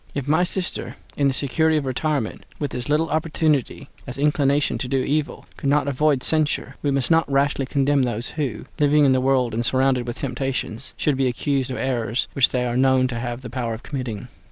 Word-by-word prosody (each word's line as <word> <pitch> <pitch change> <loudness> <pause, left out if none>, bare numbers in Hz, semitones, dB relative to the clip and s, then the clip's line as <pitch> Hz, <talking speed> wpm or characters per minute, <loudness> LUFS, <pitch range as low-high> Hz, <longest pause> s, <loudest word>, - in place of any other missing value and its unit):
If 140 -1 -3
my 160 +4 +3
sister, 180 0 -3 0.2
in 140 - +2
the 135 - +1
security 160 +4 +2
of 145 - -1
retirement, 135 -2 -2
with 145 - -3
as 125 +3 -4
little 155 +2 +2
opportunity 155 -3 0 0.2
as 125 - -6
inclination 145 0 +1
to 130 - -3
do 135 +1 0
evil, 150 +1 -2
could 140 - -1
not 145 0 +2
avoid 140 -1 +1
censure, 155 -2 0
we 145 - 0
must 135 -1 0
not 160 -3 +3
rashly 140 -1 +1
condemn 140 0 +2
those 120 -2 -1
who, 145 -7 -3
living 150 0 +4
in 135 - +5
the 130 0 +3
world 130 -3 +2
and 115 +2 -1
surrounded 130 0 +1
with 120 - -4
temptations, 130 -2 -3
should 145 -3 +1
be 135 -1 +2
accused 135 +1 -1
of 125 - -4
errors 120 -2 -1
which 135 - +4
they 125 -1 -1
are 120 -1 -2
known 130 0 +4
to 115 -2 -3
have 120 +1 -5
the 125 - -6
power 120 -3 -2
of 110 - -12
committing. 125 -6 -5
135 Hz, 210 wpm, -23 LUFS, 125-145 Hz, 0.2 s, in